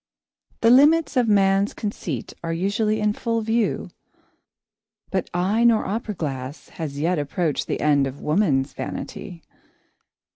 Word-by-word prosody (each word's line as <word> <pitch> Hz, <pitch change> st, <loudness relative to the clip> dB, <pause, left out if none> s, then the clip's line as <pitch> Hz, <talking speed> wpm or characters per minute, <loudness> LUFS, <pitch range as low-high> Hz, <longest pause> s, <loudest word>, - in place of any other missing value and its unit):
The 230 Hz, -, +5 dB
limits 300 Hz, +5 st, +5 dB
of 245 Hz, -2 st, +3 dB
man's 195 Hz, -1 st, +3 dB
conceit 170 Hz, -, -4 dB
are 165 Hz, -, -2 dB
usually 200 Hz, +5 st, 0 dB
in 210 Hz, -1 st, +1 dB
full 230 Hz, +1 st, -1 dB
view, 225 Hz, +1 st, -1 dB, 1.2 s
but 190 Hz, -2 st, -1 dB
eye 190 Hz, +6 st, +1 dB
nor 230 Hz, -2 st, +4 dB
opera 210 Hz, +1 st, -3 dB
glass 135 Hz, -2 st, -5 dB
has 155 Hz, -4 st, -6 dB
not 145 Hz, -, -4 dB
yet 175 Hz, 0 st, +1 dB
approached 145 Hz, +1 st, -1 dB
the -, -, -2 dB
end 145 Hz, -2 st, +3 dB
of 135 Hz, +2 st, -8 dB
woman's 150 Hz, -5 st, +1 dB
vanity. 175 Hz, -5 st, -7 dB
195 Hz, 140 wpm, -23 LUFS, 150-220 Hz, 1.2 s, The